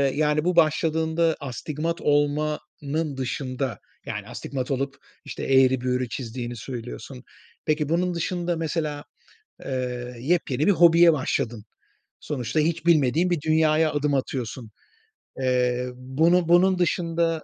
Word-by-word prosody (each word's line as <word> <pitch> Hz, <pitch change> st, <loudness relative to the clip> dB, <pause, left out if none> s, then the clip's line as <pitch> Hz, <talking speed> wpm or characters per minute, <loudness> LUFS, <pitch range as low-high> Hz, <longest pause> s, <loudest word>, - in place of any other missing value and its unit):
yani, 150 Hz, 0 st, +2 dB
bu 180 Hz, -1 st, +1 dB
başladığında 160 Hz, 0 st, +2 dB
astigmat 150 Hz, +4 st, -4 dB
olmanın 145 Hz, 0 st, -1 dB
dışında, 130 Hz, -1 st, -3 dB, 0.3 s
yani, 105 Hz, -1 st, -5 dB
astigmat 130 Hz, +2 st, -5 dB
olup, 135 Hz, +1 st, -2 dB, 0.3 s
işte, -, -, -6 dB
eğri 130 Hz, -1 st, +4 dB
büğrü 125 Hz, -1 st, -1 dB
çizdiğini 120 Hz, -1 st, -5 dB
söylüyorsun. 125 Hz, +2 st, -8 dB, 0.4 s
Peki, 150 Hz, -1 st, 0 dB
bunun 175 Hz, +2 st, +1 dB
dışında 175 Hz, +1 st, -2 dB
mesela, 155 Hz, -2 st, -3 dB, 0.6 s
eee, 125 Hz, -2 st, -4 dB
yepyeni 145 Hz, 0 st, 0 dB
bir 205 Hz, -, +6 dB
hobiye 170 Hz, -1 st, +6 dB
başladın. 120 Hz, -6 st, -2 dB, 0.6 s
Sonuçta 130 Hz, +1 st, -2 dB
hiç 165 Hz, +2 st, -1 dB
bilmediğin 165 Hz, +2 st, +3 dB
bir 170 Hz, -4 st, +1 dB
dünyaya 155 Hz, 0 st, +2 dB
adım 145 Hz, -1 st, 0 dB
atıyorsun. 125 Hz, -3 st, -3 dB, 0.7 s
Eee, 125 Hz, -1 st, +1 dB
bunu 160 Hz, +7 st, +2 dB
bunun 185 Hz, +1 st, +5 dB
dışında, 165 Hz, -2 st, 0 dB
145 Hz, 115 wpm, -24 LUFS, 130-165 Hz, 0.7 s, bir